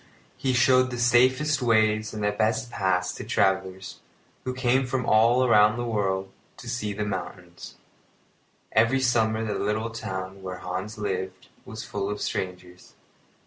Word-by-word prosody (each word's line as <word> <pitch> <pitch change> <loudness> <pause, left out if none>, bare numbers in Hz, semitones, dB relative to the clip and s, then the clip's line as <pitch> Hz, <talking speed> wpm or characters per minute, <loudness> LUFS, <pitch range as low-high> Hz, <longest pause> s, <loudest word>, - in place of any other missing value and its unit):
He 130 - -1
showed 130 +1 +4
the 125 - -5
safest 130 +5 +3
ways 110 -2 +2
and 105 -1 -5
best 110 +3 0
paths 95 -3 0
to - - -7
travellers, 95 0 -1 0.5
who 130 - -2
came 130 0 +1
from 125 0 -2
all 115 +3 +4
over 105 -3 +5
the 120 - -2
world 95 -4 -1 0.3
to 125 - -11
see 115 -3 -3
the 105 +1 -3
mountains. 90 -3 -7 1.0
Every 115 +4 +3
summer 115 -3 +1
the 105 - -2
little 110 +2 -1
town 95 -3 -6
where 95 -1 -6
Hans 90 +4 -5
lived 95 -3 -4 0.2
was 110 0 -7
full 100 -1 -4
of 105 0 -4
strangers. 90 -1 -5
110 Hz, 145 wpm, -25 LUFS, 95-120 Hz, 1.0 s, over